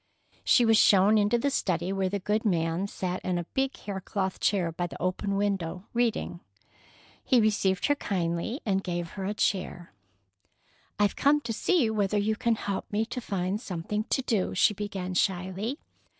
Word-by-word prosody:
She 245 - +5
was 225 -1 +5
shown 205 +2 +6
into 210 +3 +3
the 280 +4 0
study, 180 -6 0
where 190 -1 0
the 200 - -1
good 210 +3 -1
man 170 -1 0
sat 185 -2 -4
in 180 -1 -1
a 175 - -2
big 265 +9 -2
hair 195 -2 -5
cloth 190 0 -3
chair 185 -5 +1
by 175 +2 -3
the - - -10
open 185 +3 -1
window, 190 -3 -1
reading. 235 -7 0 0.8
He 255 - +4
received 200 -4 +2
her 290 - +4
kindly 180 - -2
and 195 -2 +1
gave 175 -1 -3
her 195 -2 -5
a 205 +2 -2
chair. 180 - -1 1.0
"I've 205 -1 +2
come 290 +1 +4
to 230 -5 -3
gee 250 -1 +2
whether 210 -1 0
you 215 +2 +1
can 230 +1 +1
help 200 -2 -4
me 215 +2 +1
to 250 +2 -5
find 195 -1 -2
something 205 +2 -3
to 265 - 0
do," 210 -8 0
she 210 +4 +4
began 195 -2 -4
shyly. 190 +7 -1
200 Hz, 180 wpm, -28 LUFS, 185-220 Hz, 1.0 s, shown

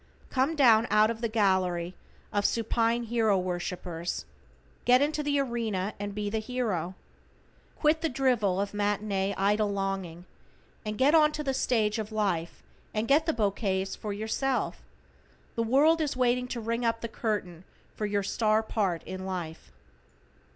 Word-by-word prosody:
Come 270 +5 +1
down 235 -5 +5
out 215 +1 +4
of 230 0 -7
the 235 - +1
gallery 185 -5 +1 0.4
of 205 -1 +1
supine 230 +2 +1
hero 225 -3 +2
worshippers, 180 -1 -3 0.6
get 250 +1 +5
into 300 +2 +1
the 290 -1 0
arena 225 -6 -1
and 205 0 -4
be 210 -1 -2
the 220 +2 -1
hero. 215 -7 -2 0.8
Quit 310 +1 +2
the 325 - +1
drivel 240 -8 +1
of 200 +1 -2
matinee 205 -1 0
idol 205 +1 +2
longing, 195 -3 -3 0.6
and 215 -1 -4
get 275 +4 +4
onto 305 -1 +4
the 270 -2 0
stage 225 -4 +1
of 215 0 -4
life 190 -6 -1 0.3
and 215 +2 0
get 300 +5 +4
the - - +4
bouquets 195 -5 -1
for 210 - -5
yourself. 220 +6 -1 0.7
The 230 - -1
world 290 +8 +4
is 295 -4 -1
waiting 250 0 +2
to 250 - -4
ring 230 +2 -2
up 230 -1 0
the 230 - -3
curtain 205 -7 -3 0.3
for 210 - -3
your 205 -1 0
star 215 +2 +1
part 195 -6 -1
in 185 0 -6
life. 175 -4 -6
215 Hz, 155 wpm, -28 LUFS, 195-245 Hz, 0.8 s, down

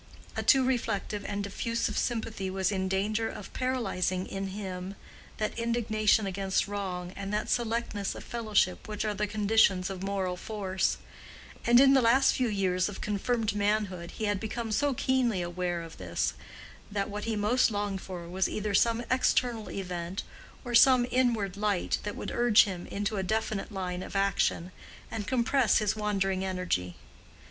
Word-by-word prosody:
A - - -1
too 265 -2 +5
reflective 220 -5 -1
and 200 0 -2
diffusive 230 +3 -2
sympathy 225 -5 -2
was 190 0 0
in 190 -1 -1
danger 210 +4 0
of 205 - -9
paralyzing 190 -8 -1
in 195 0 -4
him 190 -1 -5 0.4
that 215 -1 -2
indignation 220 -2 +2
against 195 0 0
wrong 185 -3 -4
and 200 0 -5
that 210 0 -1
selectness 230 -4 -1
of - - -8
fellowship 215 -5 0
which 210 0 -3
are 210 - 0
the 210 +1 -1
conditions 205 -3 +3
of 185 -1 -6
moral 195 -2 -1
force; 190 -2 -1 0.7
and 240 +1 +7
in 270 0 +7
the 270 - +5
last 255 +4 +5
few 255 - +1
years 190 -3 +1
of 205 - -8
confirmed 215 +2 -1
manhood 205 -4 0
he 220 - -4
had 205 -2 +1
become 225 +1 -4
so 285 +4 +1
keenly 240 -8 +1
aware 175 0 -2
of 165 - -11
this 85 -2 -1 0.6
that 200 -1 -1
what 210 -1 -5
he 225 -1 -1
most 215 +5 +3
longed 205 -2 -2
for 175 -3 -7
was 185 +2 0
either 210 -1 -2
some 230 +3 +3
external 245 -3 +1
event, 180 -1 -4 0.4
or 240 - -4
some 250 0 +7
inward 230 -7 +1
light, 205 -3 0
that 205 - -5
would - - -5
urge 240 -3 +6
him 185 -3 -5
into 205 +1 -2
a - - 0
definite 215 +1 -2
line 180 -2 -3
of - - -8
action, 195 -2 +1 0.4
and 210 -3 -4
compress 255 -1 +3
his 210 -1 +1
wandering 195 -3 0
energy. 180 - -2
205 Hz, 165 wpm, -29 LUFS, 190-225 Hz, 0.7 s, and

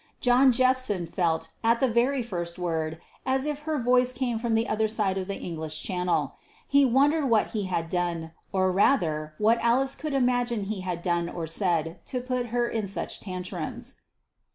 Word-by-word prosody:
John 255 +1 +5
Jephson 255 -7 +2
felt, 165 -1 -1
at 230 +1 +3
the 265 - +3
very 245 +3 +1
first 175 -6 -4
word, 160 -2 -2 0.2
as 265 +1 0
if 300 -1 -2
her 310 - +1
voice 250 +1 +3
came 245 -3 -1
from 230 -1 0
the 225 +1 +1
other 220 0 +1
side 210 -3 0
of 185 - -5
the 200 - -3
English 160 -2 -4
Channel. 180 -2 -1 0.3
He 280 0 +5
wondered 280 +4 +3
what 225 -3 +2
he 210 -3 -2
had 170 -3 -2
done, 170 -2 -2 0.2
or 185 -1 +2
rather 160 - +1
what 225 +2 +3
Alice 260 +3 +2
could 300 -2 -4
imagine 245 -4 +1
he 195 -1 -4
had 180 -2 -4
done 175 -1 0
or 170 -2 -4
said, 165 -1 -1
to 255 - -2
put 250 -1 -2
her 240 +1 0
in 220 -4 -2
such 195 - -3
tantrums. 185 -2 -6
215 Hz, 180 wpm, -27 LUFS, 175-250 Hz, 0.3 s, John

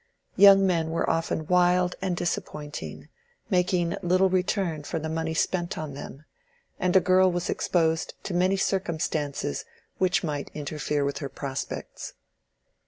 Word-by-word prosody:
Young 195 0 +8
men 165 -4 +1
were 165 - -1
often 165 -1 -1
wild 180 +1 +3
and 185 -2 -1
disappointing, 150 -4 -4 0.4
making 180 -2 +1
little 185 +1 +3
return 180 -3 0
for 145 - -4
the 160 0 -3
money 160 0 -2
spent 175 +2 -1
on 155 -3 -5
them, 140 +1 -9 0.5
and 180 0 +1
a - - +9
girl 185 +1 +4
was 175 0 -2
exposed 160 -2 0
to 190 - -4
many 185 +2 +2
circumstances 160 - -1 0.4
which 185 -1 +2
might 145 -3 -3
interfere 150 -1 -2
with 140 - -2
her 140 - -4
prospects. 135 -1 -6
170 Hz, 140 wpm, -26 LUFS, 155-185 Hz, 0.5 s, a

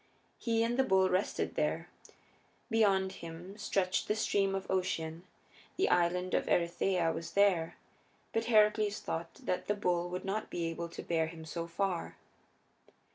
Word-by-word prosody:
He 230 -1 +1
and 240 +2 0
the - - +6
bull 190 -6 +3
rested 185 +3 0
there. - - -1 0.8
Beyond 195 -4 +3
him 170 +2 -9
stretched 185 -2 0
the 210 - +1
Stream 195 -3 +1
of 195 0 -3
Ocean; 170 -2 -2 0.5
the 385 - +2
Island 180 +1 +2
of - - +1
Erytheia 170 0 +2
was 165 - -6
there, 190 -5 +3 0.6
but 225 0 0
Heracles 210 -2 +4
thought 165 0 -4
that 180 - -3
the 205 - +1
bull 175 -3 0
would 180 +1 -4
not 210 +3 -2
be 170 - -2
able 165 +1 -3
to - - -8
bear 160 -2 +1
him 160 -1 -9
so 170 +1 -4
far. 180 0 -2
185 Hz, 155 wpm, -32 LUFS, 170-205 Hz, 0.8 s, the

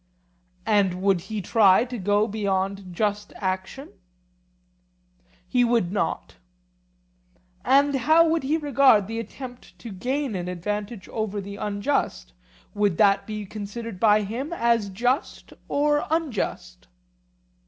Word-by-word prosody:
And 200 -4 +2
would 195 -3 +3
he 215 -3 -3
try 205 +2 +4
to 250 -1 -6
go 205 +2 +2
beyond 195 -2 -2
just 205 +2 -2
action? 190 +8 -4 1.6
He 245 +6 +2
would 230 -7 +1
not. 205 - -3 1.3
And 280 +2 +4
how 315 +6 +4
would 325 0 +1
he 290 +4 0
regard 275 -8 +4
the 225 +3 -4
attempt 245 +3 -9
to 230 - -9
gain 255 +6 -2
an 180 -2 -4
advantage 205 +3 -4
over 215 -2 -3
the 200 +1 -7
unjust; 205 - -2 0.4
would 205 -5 +1
that 200 -2 +3
be 215 -1 -5
considered 210 +1 -7
by 210 0 +4
him 245 +10 -4
as 235 -8 +1
just 245 - -2
or 295 +1 +1
unjust? 255 - -3
215 Hz, 120 wpm, -24 LUFS, 195-250 Hz, 1.6 s, try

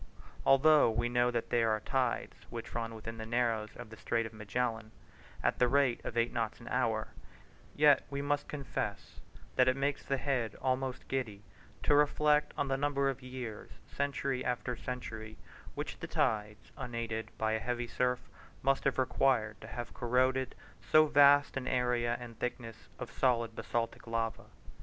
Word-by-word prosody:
Although 145 0 +6
we 120 +2 0
know 120 0 +3
that 120 -1 -2
there 115 -1 +3
are 110 0 +1
tides, 105 - -1
which 115 -1 -7
run 115 -1 -3
within 115 +1 -7
the - - -4
Narrows 115 -2 0
of 120 -2 -9
the 110 - -10
Strait 115 +1 0
of 115 - -8
Magellan 110 +1 -2 0.5
at - - +1
the 125 - +5
rate 135 -1 +2
of 120 - -5
eight 115 0 +2
knots 115 -2 -2
an - - -12
hour, - - 0 0.7
yet 145 -1 +5
we 140 -1 -3
must 145 0 -1
confess 140 -3 -4 0.4
that 130 0 +5
it 130 - +4
makes 140 +1 0
the 135 - -1
head 125 -6 -1
almost 130 0 -1
giddy 110 -7 -3 0.4
to - - +4
reflect 150 0 +3
on 140 - 0
the 135 0 0
number 140 -1 +1
of 135 - -9
years, 125 -4 -7 0.2
century 140 -2 -2
after 125 0 -2
century, 110 -3 -6 0.4
which - - -5
the - - -5
tides, 105 0 -1
unaided 115 -4 -4
by 110 0 0
a 110 - +1
heavy 120 +1 -2
surf, 125 +1 -1 0.4
must 135 0 +2
have 135 - +2
required 125 -4 +1
to 110 - -9
have 120 +1 -6
corroded 130 +1 +1 0.3
so 155 0 +5
vast 145 -1 +6
an 135 -1 -3
area 125 -1 +1
and 120 -2 -10
thickness 120 -2 -5
of 120 -2 -7
solid 115 -3 +1
basaltic 115 +1 -3
lava. 115 0 -2
125 Hz, 170 wpm, -32 LUFS, 115-135 Hz, 0.7 s, Although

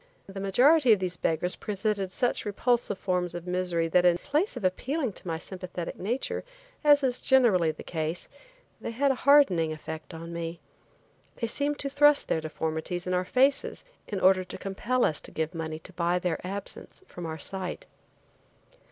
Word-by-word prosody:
The 195 0 -8
majority 250 - +5
of 205 - +1
these 180 -1 +1
beggars 170 +2 +1
presented 205 -1 -2
such 245 +6 0
repulsive 220 0 0
forms 180 -2 -1
of 175 0 -6
misery 180 -2 0
that 180 +2 +4
in 175 -1 +5
place 290 - -1
of 235 - -6
appealing 255 - -1
to 185 - -10
my 165 -1 -1
sympathetic 180 0 -6
nature, 235 +8 -2 0.4
as 290 -1 +6
is 255 -2 +1
generally 225 -11 +4
the 155 - -6
case, 160 +1 -3 0.5
they - - -4
had 270 +5 +2
a 270 +1 -2
hardening 185 - +5
effect 155 +1 -7
on 165 +1 -8
me. 170 0 -5 0.8
They 230 - -2
seemed 285 +5 -1
to 280 - -2
thrust 290 +1 +4
their 160 - +1
deformities 160 +3 -3
in 180 - -1
our 180 0 +1
faces 270 - +2 0.2
in 200 - -3
order 185 0 +4
to 185 - -8
compel 235 +6 0
us 155 - 0
to - - -7
give 160 +2 -3
money 160 -1 -4
to 175 +4 -13
buy 175 +1 +1
their 180 -2 -2
absence 200 - -6
from 175 -1 -7
our 160 0 -5
sight. 185 +3 -4
185 Hz, 180 wpm, -28 LUFS, 170-245 Hz, 0.8 s, as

